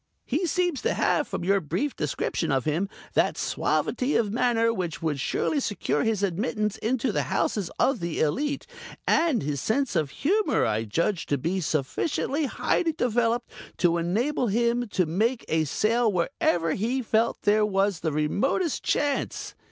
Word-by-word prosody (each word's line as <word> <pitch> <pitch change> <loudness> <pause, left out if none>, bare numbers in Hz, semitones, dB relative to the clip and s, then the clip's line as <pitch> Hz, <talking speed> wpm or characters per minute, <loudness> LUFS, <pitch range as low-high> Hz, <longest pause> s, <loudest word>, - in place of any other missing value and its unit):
He 325 +8 0
seems 355 -3 0
to 465 - 0
have, - - +1
from - - -4
your 195 +2 +2
brief 180 - -2
description 150 -1 -2
of 135 -2 +1
him, 165 +6 0 0.2
that - - +2
suavity 260 +3 0
of 215 -3 +2
manner 230 -1 +2
which 175 -7 -3
would 150 -3 -1
surely 290 - 0
secure 205 - -1
his 220 -3 0
admittance 210 +3 -1
into 240 +1 0
the - - 0
houses 200 -5 0
of 265 -4 +2
the 170 -1 -3
elite, 280 - 0 0.4
and 315 - +2
his 140 -2 -2
sense 270 +4 0
of 150 -3 +1
humor 375 - +1
I 110 +1 0
judge 170 - -1
to 145 - +1
be 170 +8 -1
sufficiently 265 - -1
highly 325 +4 0
developed 240 -3 0 0.3
to 170 -1 +2
enable 235 - 0
him 235 +3 +1
to 185 -3 +1
make 220 +10 0
a 160 0 +1
sale 225 - +2
wherever 170 -2 +1
he 250 +6 -1
felt 225 +1 +1
there 210 +1 +4
was 195 -3 +1
the 160 - -1
remotest 205 - 0
chance. 285 -1 -1
215 Hz, 160 wpm, -26 LUFS, 170-255 Hz, 0.4 s, there